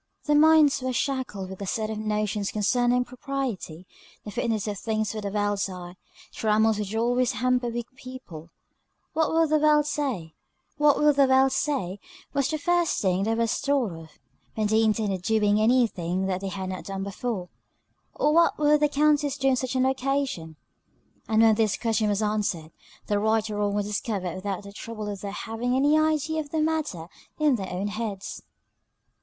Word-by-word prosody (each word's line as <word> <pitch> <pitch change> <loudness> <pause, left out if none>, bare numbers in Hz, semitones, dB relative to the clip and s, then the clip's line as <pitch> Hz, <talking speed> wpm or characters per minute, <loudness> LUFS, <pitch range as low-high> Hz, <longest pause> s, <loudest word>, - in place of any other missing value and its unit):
Their 295 - +3
minds 310 -2 +5
were 255 0 -2
shackled 250 -9 -2
with 190 - -9
a 200 - -4
set 215 +2 -2
of 215 - -4
notions 210 -1 -1
concerning 245 +4 +1
propriety, 250 - -5 0.4
the 210 - -6
fitness 220 0 -1
of 205 -2 -3
things 220 -1 -1
for 215 - -5
the 200 - -3
world's 205 -1 0
eye, 180 -1 -8 0.4
trammels 220 0 +2
which 210 +1 -4
always 245 +2 +1
hamper 250 +2 +1
weak 235 0 -3
people. 255 -12 -10 0.6
What 315 0 +1
will 325 0 +3
the 310 0 +2
world 300 -1 +4
say? 250 - -3 0.5
was 295 0 +4
the 270 - +1
first 345 +2 +1
thing 190 -1 +1
that 225 +1 0
was 230 -1 +1
thought 275 -7 0
of, 165 -1 -10 0.5
when 215 - 0
they 220 +1 +3
intended 210 -4 0
doing 210 +1 +2
any 245 +3 +4
thing 185 -2 -3
they 190 0 -2
had 190 -1 -4
not 185 -1 -6
done 195 -1 -4
before. 200 -2 -4 0.7
Or 300 - +2
what 335 +1 +4
would 300 0 +4
the 295 0 +3
Countess 290 -1 +2
do 270 -1 +2
on - - +3
such 255 0 -3
an 260 0 +3
occasion? 265 - -1 0.7
And 220 0 +3
when 225 -1 +6
this 215 -1 +1
question 220 -2 0
was 205 +1 0
answered, 205 -7 -1 0.3
the 205 -1 0
right 220 +1 +1
or 205 - -3
wrong 205 -1 0
was 205 -1 0
discovered 205 -4 -3
without 195 +1 -4
the 200 0 -11
trouble 215 -1 -6
of 200 -2 -6
their 200 - -4
having 230 +4 -3
any 285 +3 +3
idea 310 0 +1
of 295 - -10
the 315 - -1
matter 310 - -1 0.3
in 300 -2 +3
their 190 -5 -5
own 190 +3 -2
heads. 205 -2 -5
225 Hz, 175 wpm, -26 LUFS, 200-275 Hz, 0.7 s, when